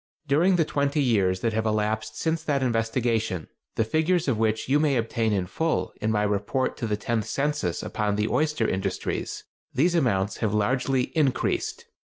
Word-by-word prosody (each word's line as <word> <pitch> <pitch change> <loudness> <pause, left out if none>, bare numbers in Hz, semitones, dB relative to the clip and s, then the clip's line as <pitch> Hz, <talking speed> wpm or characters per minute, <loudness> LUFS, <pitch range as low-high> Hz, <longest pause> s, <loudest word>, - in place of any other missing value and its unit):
During 165 +7 +4
the 165 -3 +3
twenty 140 0 0
years 100 -9 +2
that 115 -1 0
have 110 0 0
elapsed 110 +1 -1
since 160 -1 0
that 145 -4 0
investigation—the 115 -4 -1
figures 160 +7 +1
of 120 -5 +1
which 110 -1 0
you 140 +3 +3
may 145 -3 +2
obtain 115 -1 0
in 95 -3 0
full 95 - -1
in 105 - 0
my 105 -1 +1
Report 105 +5 0
to 115 - -3
the 105 -1 0
Tenth 110 0 -1
Census 140 - -1
upon 105 -2 -1
the 105 +1 0
Oyster 150 -3 +1
Industries—these 135 - -2
amounts 110 - +1
have 105 -2 0
largely 130 +6 0
increased. 145 -5 0
115 Hz, 165 wpm, -26 LUFS, 105-145 Hz, -, During